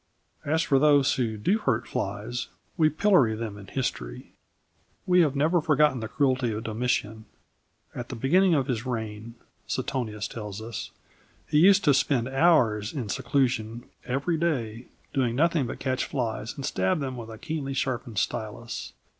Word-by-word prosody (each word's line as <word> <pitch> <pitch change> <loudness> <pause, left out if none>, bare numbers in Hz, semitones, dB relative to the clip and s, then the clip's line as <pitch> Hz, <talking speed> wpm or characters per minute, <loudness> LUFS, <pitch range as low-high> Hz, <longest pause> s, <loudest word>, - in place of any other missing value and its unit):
As 160 +3 +1
for 135 -2 +3
those 145 -1 +5
who 115 -4 -1
do 190 - +1
hurt 120 - 0
flies, 105 +5 -3 0.3
we 155 -3 +4
pillory 155 - +3
them 110 -2 -5
in 100 -1 -11
history. 60 - -4 0.7
We 180 -1 +5
have 145 -4 +2
never 160 +5 +2
forgotten 150 -3 +3
the 110 - -4
cruelty 130 -2 +1
of 110 +1 -4
Domitian. 110 -1 -2 0.7
"At 120 0 -6
the - - -5
beginning 175 +9 +3
of 135 -3 +1
his 120 -4 -2
reign," 110 -2 -5 0.3
Suetonius 110 -6 -2
tells 105 -3 -7
us 115 0 -6 0.6
"he 150 - +3
used 195 +3 +6
to 145 - +5
spend 130 -2 +1
hours 130 -8 +3
in 125 -8 -4
seclusion 120 -3 0 0.2
every 140 +7 -1
day, 125 -8 -2 0.3
doing 125 -4 +1
nothing 160 -2 +2
but - - -5
catch 130 -1 -1
flies 115 -3 -3
and 135 - -5
stab 95 -3 0
them 135 -3 -3
with 115 -2 -8
a 110 - -8
keenly 140 +1 -4
sharpened 125 -4 -2
stylus. 110 +3 -3
125 Hz, 160 wpm, -27 LUFS, 110-145 Hz, 0.7 s, used